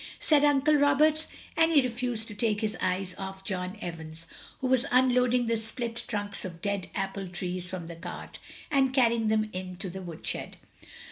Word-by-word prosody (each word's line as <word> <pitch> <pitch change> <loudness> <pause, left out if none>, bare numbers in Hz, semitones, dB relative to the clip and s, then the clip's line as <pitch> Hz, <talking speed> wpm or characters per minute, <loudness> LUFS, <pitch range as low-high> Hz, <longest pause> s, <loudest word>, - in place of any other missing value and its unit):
said 295 -2 +4
Uncle 290 +1 +4
Roberts; 300 +2 +4 0.3
and 325 0 +4
he 305 - +7
refused 245 -3 -1
to 210 - -7
take 210 0 +1
his 215 -1 -1
eyes 185 0 0
off 190 0 -6
John 185 0 -3
Evans, 165 -2 -7 0.3
who - - -3
was 260 +1 +3
unloading 250 -1 +4
the 230 0 +1
split 230 +1 -4
trunks 205 -2 -3
t)f 175 -3 -7
dead 200 0 -2
apple 195 -1 -2
trees 180 0 -4
from 185 -2 -5
the 170 0 -7
cart, 165 - -8 0.3
and 265 -2 +3
carrying 235 -3 +4
them 215 0 +1
in 185 0 -5
to 185 0 -5
the 190 +2 -6
woodshed. 170 -3 -5
215 Hz, 180 wpm, -29 LUFS, 185-255 Hz, 0.3 s, he